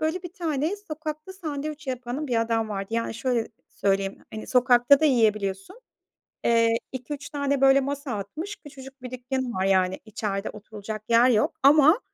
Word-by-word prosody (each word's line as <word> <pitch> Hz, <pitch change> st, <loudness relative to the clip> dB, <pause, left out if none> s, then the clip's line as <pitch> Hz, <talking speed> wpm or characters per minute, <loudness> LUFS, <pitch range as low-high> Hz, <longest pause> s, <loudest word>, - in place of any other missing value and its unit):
böyle, 320 Hz, +4 st, -1 dB
bir 355 Hz, -1 st, -8 dB
tane 325 Hz, -1 st, -1 dB
sokakta 315 Hz, -2 st, -7 dB
sandviç 305 Hz, -4 st, -5 dB
yapanı 255 Hz, +3 st, -4 dB
bir 240 Hz, -4 st, +1 dB
adam 225 Hz, -1 st, 0 dB
vardı. 195 Hz, -2 st, -4 dB
Yani 230 Hz, -1 st, -1 dB
şöyle 235 Hz, -1 st, -1 dB, 0.2 s
söyleyeyim, 195 Hz, 0 st, -1 dB
hani, 215 Hz, -, -6 dB
sokakta 250 Hz, +2 st, +5 dB
da -, -, +2 dB
yiyebiliyorsun. 215 Hz, -, +1 dB, 0.6 s
Eee, 230 Hz, -1 st, +3 dB
2-3 270 Hz, +3 st, -6 dB
tane, 280 Hz, -1 st, -1 dB
böyle, 270 Hz, 0 st, +6 dB
masa 280 Hz, 0 st, -4 dB
atmış, 310 Hz, -, -6 dB
küçücük 270 Hz, -2 st, -13 dB
bir 250 Hz, -1 st, -7 dB
dükkânı 255 Hz, 0 st, -3 dB
var 190 Hz, 0 st, -1 dB
yani 190 Hz, -1 st, +2 dB
içeride 205 Hz, -2 st, -3 dB
oturulacak 215 Hz, 0 st, -8 dB
yer 235 Hz, +2 st, +6 dB
yok 220 Hz, -4 st, +2 dB
ama 300 Hz, -, +7 dB
255 Hz, 160 wpm, -25 LUFS, 220-295 Hz, 0.6 s, ama